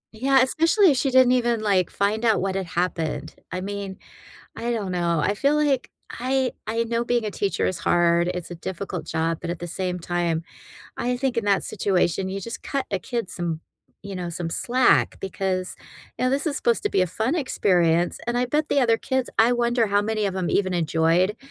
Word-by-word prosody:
Yeah, 265 +2 +4
especially 330 +6 +4
if 265 - 0
she 270 - +1
didn't 255 -1 +5
even, 240 -3 +2
like, 195 -5 +2
find 210 +3 0
out 220 -3 +3
what 190 0 -1
had 190 -2 -3
happened. 175 -2 -2 0.2
I 185 - -3
mean, 200 -1 -5 0.6
I 235 +1 -3
don't 200 -5 -2
know, 170 -2 +1
I 200 - +1
feel 280 +8 +2
like 290 -4 +1 0.2
I 260 +1 -1
I 230 +1 0
know 230 +1 -1
being 240 -2 0
a 210 - -2
teacher 200 0 -1
is 185 -3 -2
hard, 170 +1 +3
it's 180 -1 -4
a - - -5
difficult 180 +1 -5
job, 165 0 -1
but 170 - -5
at 175 - -3
the 175 - -5
same 180 +1 -3
time, 170 -1 -1 0.5
I 245 0 -1
think 260 -2 -1
in 230 - 0
that 200 -2 +2
situation, 190 -2 0
you 195 +1 -4
just 230 +4 -7
cut 275 -1 -2
a 195 - 0
kid 235 +1 -4
some 165 -2 -3 0.4
you 200 -1 -7
know, 175 -1 -4
some 170 0 -4
slack, 245 +8 +2
because, 190 -1 -2 0.4
now, 255 - +1
this 280 +4 0
is 295 -1 0
supposed 235 -1 +1
to - - +3
be 185 - +2
a - - +1
fun 225 - -1
experience, 175 - +2
and 240 0 0
I 250 - +1
bet 300 +4 0
the 280 - +3
other 230 -2 +4
kids 260 +1 -1
I 230 +2 +5
wonder 240 -2 +1
how 205 0 +3
many 215 0 -1
of 195 -2 -1
'em 185 -2 -1
even 185 -2 +1
enjoyed 170 +4 +2
200 Hz, 210 wpm, -24 LUFS, 180-245 Hz, 0.6 s, didn't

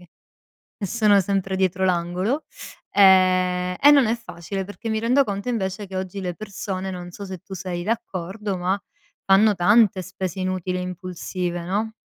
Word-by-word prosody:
ch - - -15 0.8
e - - 0
sono 210 -1 +4
sempre 195 0 -1
dietro 190 0 +1
l'angolo 185 - 0 0.5
e 185 -2 +4
e 290 - +8
non 280 -4 +5
è 225 +2 +1
facile 195 -3 -6
perché 205 +4 -8
mi 220 - 0
rendo 245 +5 +3
conto 200 -1 -4
invece 205 -3 -2
che 190 - -7
oggi 190 +1 -4
le 180 -2 -3
persone, 195 -1 -5
non 180 -1 -7
so 200 - -8
se 190 -2 -7
tu 190 +1 -10
sei 180 -2 -4
d'accordo, 205 -2 -3
ma 185 +3 0 0.5
fanno 205 +2 +5
tante 200 +1 +4
spese 185 0 -5
inutili 185 0 -2
e - - -3
impulsive, 180 -1 -4
no? 210 +5 -1
190 Hz, 170 wpm, -23 LUFS, 180-205 Hz, 0.8 s, e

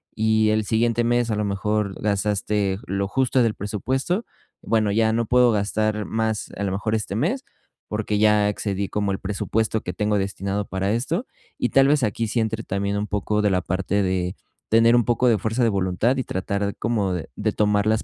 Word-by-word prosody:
Y 110 0 +2
el 110 0 +1
siguiente 115 +2 +1
mes 120 0 +1
a - - +1
lo 105 - -1
mejor 100 0 -1
gastaste 105 -1 0
j - - -15
lo 100 +1 -1
justo 130 0 +2
del 115 - +1
presupuesto. 130 - -2 0.4
Bueno, 110 -2 +1
ya 110 0 +3
no 115 +1 +1
puedo 125 0 +5
gastar 105 0 0
más 110 -1 -2
a 100 - -3
lo 95 - -1
mejor 110 +3 -1
este 105 -2 -3
mes, 225 - 0 0.5
porque 105 -1 -1
ya 105 -1 +4
excedí 100 -1 -2
como 105 -1 -1
el 95 - -2
presupuesto 110 +2 -1
que 90 - -4
tengo 105 +1 0
destinado 100 +1 -2
para 95 +1 -1
esto 165 - -1 0.3
y 125 - +1
tal 135 0 +4
vez, 150 0 +3
aquí 115 +1 0
sí 115 +2 -1
entre 110 0 -2
también, 100 +1 -2
un 105 +1 -2
poco 105 +1 -1
de 105 - +3
la 90 -1 +1
parte 95 +3 -1
de 90 -1 -1 0.3
tener 115 +1 +5
un 120 - +3
poco 120 +1 +2
de 110 - +3
fuerza 110 +5 -1
de 115 - +4
voluntad 100 +6 +1
y 130 - 0
tratar 100 +1 -2
como 105 -4 0
de 90 -3 -5
de 105 +1 -1
tomar 105 -1 +2
las 110 0 +2
105 Hz, 205 wpm, -23 LUFS, 100-115 Hz, 0.5 s, puedo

